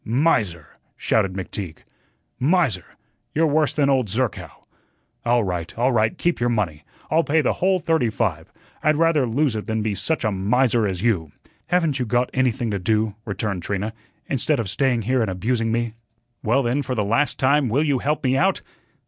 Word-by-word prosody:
"Miser!" 110 Hz, -, 0 dB, 0.2 s
shouted 100 Hz, -4 st, +1 dB
McTeague. 95 Hz, -3 st, -5 dB, 0.6 s
"Miser! 140 Hz, -, +2 dB, 0.5 s
you're 160 Hz, +2 st, +3 dB
worse 155 Hz, -1 st, +2 dB
than 145 Hz, -2 st, +1 dB
old 130 Hz, -4 st, +2 dB
Zerkow. 115 Hz, +4 st, -3 dB, 0.6 s
All 120 Hz, -1 st, +2 dB
right, 90 Hz, -2 st, -4 dB
all 125 Hz, +3 st, +2 dB
right, 110 Hz, -2 st, +1 dB
keep 175 Hz, -5 st, 0 dB
your 120 Hz, 0 st, +1 dB
money. 90 Hz, -10 st, -1 dB, 0.3 s
I'll 160 Hz, +2 st, +4 dB
pay 160 Hz, +1 st, +2 dB
the -, -, +1 dB
whole 190 Hz, +1 st, +3 dB
thirty 160 Hz, -8 st, +1 dB
five. 95 Hz, -8 st, -2 dB, 0.3 s
I'd 155 Hz, +1 st, +3 dB
rather 160 Hz, -4 st, +3 dB
lose 130 Hz, +1 st, +1 dB
it 105 Hz, -, -4 dB
than 110 Hz, -1 st, -1 dB
be 110 Hz, -1 st, -1 dB
such 105 Hz, -, -1 dB
a 110 Hz, -, +1 dB
miser 110 Hz, +3 st, +2 dB
as 95 Hz, 0 st, -3 dB
you." 90 Hz, -10 st, +1 dB, 0.4 s
"Haven't 165 Hz, -6 st, +1 dB
you 125 Hz, -, -1 dB
got 120 Hz, +2 st, +1 dB
anything 120 Hz, -3 st, 0 dB
to 100 Hz, -, -1 dB
do," 110 Hz, +2 st, +1 dB
returned 100 Hz, -3 st, -3 dB
Trina, 100 Hz, +4 st, -3 dB, 0.3 s
"instead 140 Hz, +2 st, 0 dB
of 110 Hz, -4 st, -2 dB
staying 130 Hz, -5 st, +1 dB
here 125 Hz, +3 st, +1 dB
and 110 Hz, -, 0 dB
abusing 115 Hz, +5 st, -1 dB
me?" 120 Hz, -1 st, -1 dB, 0.5 s
"Well, 120 Hz, +5 st, +2 dB
then, 125 Hz, +4 st, 0 dB
for 130 Hz, -1 st, -3 dB
the 105 Hz, -, 0 dB
last 125 Hz, +7 st, +1 dB
time, 135 Hz, 0 st, +3 dB
will 135 Hz, +7 st, +2 dB
you 140 Hz, -4 st, +1 dB
help 150 Hz, +4 st, -1 dB
me 130 Hz, 0 st, +2 dB
out?" 190 Hz, +7 st, +1 dB
120 Hz, 185 wpm, -22 LUFS, 105-140 Hz, 0.6 s, I'll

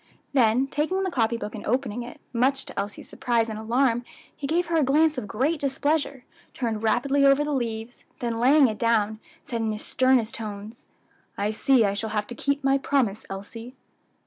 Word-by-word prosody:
Then 250 Hz, -1 st, +4 dB
taking 315 Hz, +8 st, -1 dB
the 375 Hz, -, -1 dB
copy 235 Hz, -5 st, +1 dB
book 210 Hz, -, -6 dB
and 210 Hz, -, -7 dB
opening 245 Hz, -1 st, -1 dB
it, 240 Hz, +1 st, -9 dB
much 265 Hz, +3 st, +1 dB
to -, -, -6 dB
Elsie's 205 Hz, +1 st, -5 dB
surprise 230 Hz, -2 st, 0 dB
and 215 Hz, -1 st, -5 dB
alarm 240 Hz, +2 st, +1 dB, 0.3 s
he 280 Hz, -, -5 dB
gave 345 Hz, +4 st, +1 dB
her 335 Hz, 0 st, 0 dB
a 310 Hz, -, +4 dB
glance 305 Hz, +4 st, +3 dB
of 250 Hz, -6 st, -4 dB
great 270 Hz, +10 st, 0 dB
displeasure, 285 Hz, -1 st, -1 dB, 0.3 s
turned 225 Hz, -4 st, -2 dB
rapidly 270 Hz, +5 st, +2 dB
over 275 Hz, +1 st, +5 dB
the 295 Hz, 0 st, -2 dB
leaves, 230 Hz, -2 st, -4 dB
then 235 Hz, -2 st, -3 dB
laying 270 Hz, +3 st, +6 dB
it 215 Hz, -2 st, -4 dB
down, 220 Hz, -2 st, +1 dB, 0.2 s
said 235 Hz, -2 st, -4 dB
in 220 Hz, -1 st, 0 dB
his 215 Hz, 0 st, -5 dB
sternest 255 Hz, -4 st, +2 dB
tones, 215 Hz, +1 st, -7 dB, 0.5 s
"I 205 Hz, +1 st, 0 dB
see 240 Hz, +1 st, +3 dB
I 200 Hz, -, +1 dB
shall 220 Hz, +2 st, -3 dB
have 210 Hz, -1 st, -1 dB
to 240 Hz, -, -8 dB
keep 280 Hz, +3 st, -1 dB
my 275 Hz, 0 st, +3 dB
promise, 255 Hz, -7 st, 0 dB
Elsie." 225 Hz, +6 st, -8 dB
245 Hz, 195 wpm, -25 LUFS, 220-275 Hz, 0.5 s, laying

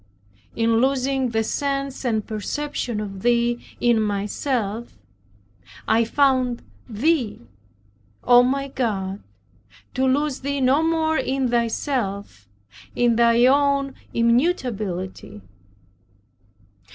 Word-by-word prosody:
In 230 Hz, 0 st, +2 dB
losing 265 Hz, 0 st, +1 dB
the 225 Hz, -1 st, 0 dB
sense 275 Hz, +3 st, -3 dB
and 220 Hz, -3 st, 0 dB
perception 240 Hz, +1 st, -3 dB
of 195 Hz, -2 st, -6 dB
Thee 240 Hz, +1 st, +1 dB, 0.2 s
in 235 Hz, -2 st, +3 dB
myself 210 Hz, +2 st, -2 dB, 0.9 s
I 225 Hz, +1 st, +3 dB
found 255 Hz, -1 st, +1 dB, 0.3 s
Thee, 245 Hz, +1 st, 0 dB, 0.8 s
O 245 Hz, 0 st, +7 dB
my 275 Hz, +2 st, 0 dB
God, 200 Hz, -7 st, -3 dB, 0.7 s
to 265 Hz, +1 st, +1 dB
lose 280 Hz, +1 st, 0 dB
Thee 280 Hz, +1 st, -3 dB
no 265 Hz, +3 st, +3 dB
more 320 Hz, -1 st, +1 dB
in 265 Hz, -1 st, -1 dB
Thyself, 225 Hz, -, -2 dB, 0.5 s
in 240 Hz, -1 st, +2 dB
Thy 235 Hz, +1 st, +4 dB
own 280 Hz, 0 st, +2 dB, 0.2 s
immutability. 215 Hz, -, -1 dB
245 Hz, 95 wpm, -22 LUFS, 220-275 Hz, 0.9 s, O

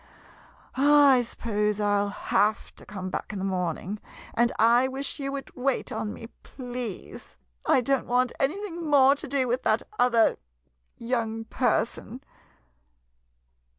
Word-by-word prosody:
I 280 Hz, -1 st, +6 dB
suppose 210 Hz, -3 st, -2 dB
I 205 Hz, -1 st, +2 dB
'11 200 Hz, 0 st, -1 dB, 0.2 s
have 210 Hz, +1 st, +1 dB
to -, -, -13 dB
come 185 Hz, -2 st, -6 dB
back -, -, -4 dB
in 210 Hz, -, -5 dB
the 190 Hz, -, -3 dB
morning 185 Hz, +2 st, -2 dB, 0.2 s
— -, -, -17 dB
and 235 Hz, 0 st, +2 dB
I 235 Hz, +3 st, +5 dB
wish 270 Hz, +3 st, -4 dB
you 275 Hz, -1 st, -3 dB
would 275 Hz, -1 st, -7 dB
wait 260 Hz, 0 st, -1 dB
on 210 Hz, -, -3 dB
me, 230 Hz, -, -9 dB, 0.2 s
please. 245 Hz, -5 st, -8 dB, 0.3 s
I -, -, +4 dB
don't 270 Hz, +2 st, 0 dB
want 250 Hz, 0 st, +1 dB
anything 345 Hz, +4 st, -2 dB
more 275 Hz, -2 st, +6 dB
to 290 Hz, +2 st, -6 dB
do 265 Hz, -1 st, 0 dB
with 245 Hz, +2 st, 0 dB
that -, -, +1 dB, 0.2 s
other 235 Hz, -2 st, +4 dB, 0.6 s
young 230 Hz, -2 st, -2 dB
person. 235 Hz, +1 st, -1 dB
245 Hz, 145 wpm, -26 LUFS, 215-270 Hz, 0.6 s, I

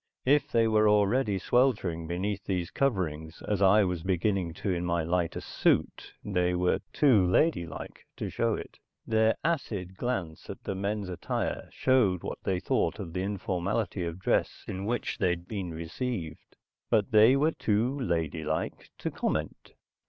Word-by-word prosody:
If 145 Hz, +3 st, +3 dB
they 115 Hz, -1 st, +3 dB
were 110 Hz, -1 st, +4 dB
already 105 Hz, +1 st, +3 dB
sweltering 95 Hz, -8 st, +1 dB
beneath 95 Hz, +3 st, -2 dB
these 90 Hz, -3 st, -2 dB
coverings, 85 Hz, -, -1 dB
as 100 Hz, -2 st, 0 dB
I 100 Hz, +2 st, +6 dB
was 90 Hz, -3 st, -1 dB
beginning 95 Hz, 0 st, 0 dB
to 100 Hz, 0 st, -2 dB
in 85 Hz, 0 st, -2 dB
my 85 Hz, -1 st, 0 dB
lighter 85 Hz, 0 st, -1 dB
suit, -, -, 0 dB
they 90 Hz, -3 st, +1 dB
were 90 Hz, 0 st, +2 dB
too 125 Hz, -10 st, +4 dB
ladylike 95 Hz, -, 0 dB
to -, -, -3 dB
show -, -, +1 dB
it. -, -, -9 dB, 0.3 s
Their 110 Hz, 0 st, +3 dB
acid 105 Hz, -, -2 dB
glance 95 Hz, -11 st, -3 dB
at -, -, -8 dB
the -, -, -3 dB
men's 100 Hz, +1 st, -2 dB
attire 90 Hz, -2 st, -3 dB
showed 110 Hz, -9 st, +2 dB
what -, -, -5 dB
they 95 Hz, -2 st, 0 dB
thought -, -, 0 dB
of 80 Hz, -, -7 dB
the 90 Hz, -, -1 dB
informality 100 Hz, 0 st, -2 dB
of 85 Hz, 0 st, -4 dB
dress 95 Hz, -, 0 dB
in 95 Hz, +1 st, -4 dB
which 120 Hz, +1 st, -2 dB
they'd 90 Hz, -2 st, 0 dB
been 95 Hz, -5 st, -4 dB
received. 85 Hz, +1 st, -5 dB, 0.3 s
But 110 Hz, +1 st, +2 dB
they 110 Hz, +4 st, +7 dB
were 150 Hz, +4 st, +3 dB
too 120 Hz, +3 st, 0 dB
ladylike 80 Hz, -, -2 dB
to -, -, -3 dB
comment. -, -, -3 dB
95 Hz, 155 wpm, -29 LUFS, 90-110 Hz, 0.3 s, they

